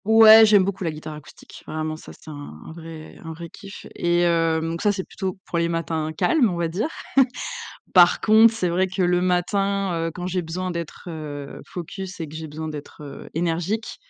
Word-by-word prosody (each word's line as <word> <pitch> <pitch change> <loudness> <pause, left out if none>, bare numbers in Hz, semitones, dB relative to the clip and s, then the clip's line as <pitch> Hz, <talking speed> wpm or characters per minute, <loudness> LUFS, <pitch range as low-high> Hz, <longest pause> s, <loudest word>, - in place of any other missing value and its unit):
Ouais, 220 0 +9
j'aime 205 -2 +6
beaucoup 190 0 -3
la 170 - 0
guitare 155 0 -8
acoustique. 150 -1 -13
Vraiment, 155 0 -3
ça, 155 - -12
c'est 155 - -12
un 145 - -9
un - - -9
vrai 160 -1 -10
un 160 -1 -6
vrai 170 +1 -9
kiff 195 +4 -11
et 175 0 +1
heu 165 -1 +2
donc 165 +1 -3
ça, 205 - +3
c'est 195 -2 -3
plutôt 190 -1 -5
pour 170 - -2
les 170 0 +1
matins 165 -2 -2
calmes, 245 - +2
on 175 - -3
va 170 -1 0
dire. 190 - -1 1.1
Par 175 -1 +7
contre, 220 +1 +6
c'est 205 -6 -1
vrai 180 +2 +1
que 185 +1 -5
le 180 0 +3
matin, 195 +2 +1 0.2
heu, - - -4
quand 180 0 -5
j'ai 180 0 -1
besoin 180 +3 -4
d'être, 170 -2 -6
heu, 145 -4 -7
focus 185 +1 -7
et 160 - -4
que 150 - -11
j'ai 160 0 -6
besoin 155 +1 -6
d'être, 150 0 -9
heu, 145 - -10
énergique, 175 +7 -2
170 Hz, 210 wpm, -23 LUFS, 160-190 Hz, 1.1 s, Ouais